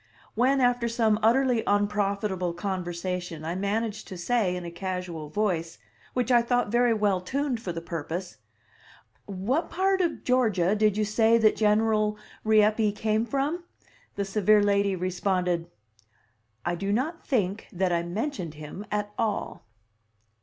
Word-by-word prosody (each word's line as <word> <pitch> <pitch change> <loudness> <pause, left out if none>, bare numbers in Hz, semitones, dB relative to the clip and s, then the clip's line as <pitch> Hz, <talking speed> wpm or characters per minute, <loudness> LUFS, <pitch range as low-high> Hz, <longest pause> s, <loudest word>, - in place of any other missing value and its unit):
When, 260 +4 +2
after 245 -1 +2
some 225 -2 +2
utterly 245 +1 +3
unprofitable 200 -3 0
conversation, 175 -3 -4
I 165 - -2
managed 210 +3 -2
to 185 - -7
say 190 0 +1
in 180 -1 -5
a 170 - -6
casual 180 -4 -5
voice, 170 -4 -1 0.4
which 250 0 0
I 240 -1 +6
thought 245 -2 0
very 240 0 +3
well 205 -4 +1
tuned 265 +4 -2
for 185 - -4
the 165 0 -6
purpose, 170 +2 -5 0.9
"What 210 - -1
part 380 +1 +1
of 340 -3 -1
Georgia 215 -7 +2
did 215 -1 +2
you 215 - +2
say 225 +2 +4
that 220 -2 +4
General 215 0 +2 0.3
Rieppe 215 0 +3
came 215 +2 0
from?" 290 +6 -1 0.5
the 200 - -1
severe 210 +1 +3
lady 200 -1 +2
responded: 180 -1 -1 1.0
"I 175 - 0
do 195 +4 -2
not 290 +10 -1
think 205 - -1
that 185 0 0
I 170 -1 +2
mentioned 180 - -4
him 155 +7 -8
at 205 0 -2
all." 215 - -2
205 Hz, 145 wpm, -27 LUFS, 180-230 Hz, 1.0 s, I